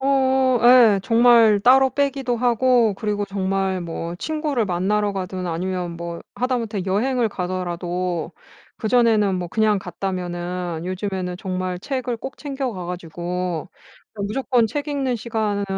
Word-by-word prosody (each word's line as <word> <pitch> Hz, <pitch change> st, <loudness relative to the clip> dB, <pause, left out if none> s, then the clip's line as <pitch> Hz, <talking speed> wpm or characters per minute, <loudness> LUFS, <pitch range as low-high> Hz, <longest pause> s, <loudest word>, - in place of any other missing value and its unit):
어 265 Hz, -2 st, +3 dB
예. 240 Hz, -5 st, +7 dB
정말 230 Hz, -2 st, +5 dB
따로 265 Hz, +3 st, +5 dB
빼기도 270 Hz, -2 st, 0 dB
하고 240 Hz, -2 st, +3 dB
그리고 205 Hz, 0 st, -2 dB
정말 195 Hz, -1 st, -1 dB
뭐 170 Hz, 0 st, -5 dB
친구를 300 Hz, -, -1 dB
만나러 200 Hz, +3 st, 0 dB
가든 185 Hz, -1 st, -4 dB
아니면 175 Hz, 0 st, -3 dB
뭐 170 Hz, 0 st, -6 dB, 0.2 s
하다 250 Hz, 0 st, 0 dB
못해 215 Hz, -4 st, -3 dB
여행을 235 Hz, +5 st, +1 dB
가더라도 180 Hz, -2 st, -3 dB, 0.5 s
그 220 Hz, -, -4 dB
전에는 220 Hz, -5 st, +3 dB
뭐 175 Hz, -1 st, -4 dB
그냥 215 Hz, 0 st, +2 dB
갔다면은 180 Hz, -3 st, -4 dB
요즘에는 185 Hz, -1 st, -3 dB
정말 185 Hz, -1 st, -3 dB
책을 255 Hz, 0 st, -3 dB
꼭 265 Hz, +3 st, -8 dB
챙겨 270 Hz, -4 st, -3 dB
가 180 Hz, -3 st, -6 dB
가지고 175 Hz, -1 st, -4 dB, 0.5 s
무조건 225 Hz, +3 st, 0 dB
책 290 Hz, +5 st, -3 dB
읽는 270 Hz, -4 st, -1 dB
시간 215 Hz, -3 st, -2 dB
205 Hz, 280 characters per minute, -22 LUFS, 180-245 Hz, 0.5 s, 예